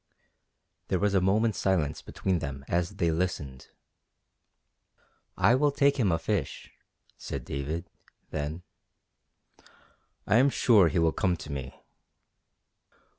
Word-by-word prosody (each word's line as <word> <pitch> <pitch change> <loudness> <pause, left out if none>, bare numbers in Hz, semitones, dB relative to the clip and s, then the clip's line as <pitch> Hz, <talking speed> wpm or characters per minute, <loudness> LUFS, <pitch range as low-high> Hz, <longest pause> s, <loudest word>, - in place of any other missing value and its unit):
There 95 - +1
was 100 +2 +1
a 95 - +3
moment's 105 +3 +1
silence 85 -7 0
between 95 -3 -2
them 70 -2 -6
as 85 0 -1
they 85 -1 +1
listened. 80 -6 -3 1.7
"I 100 +5 +4
will 145 +3 +3
take 140 0 +2
him 105 -8 +2
a 80 - +2
fish," 85 -4 -3 0.5
said 65 -3 -6
David, 75 +5 -4 0.4
then. 75 +4 -4 1.6
"I 105 - +3
am 135 +3 +5
sure 110 -8 +4
he 90 - -1
will 80 -1 +3
come 90 0 0
to 80 - -9
me." 70 -1 -6
90 Hz, 125 wpm, -28 LUFS, 75-100 Hz, 1.7 s, am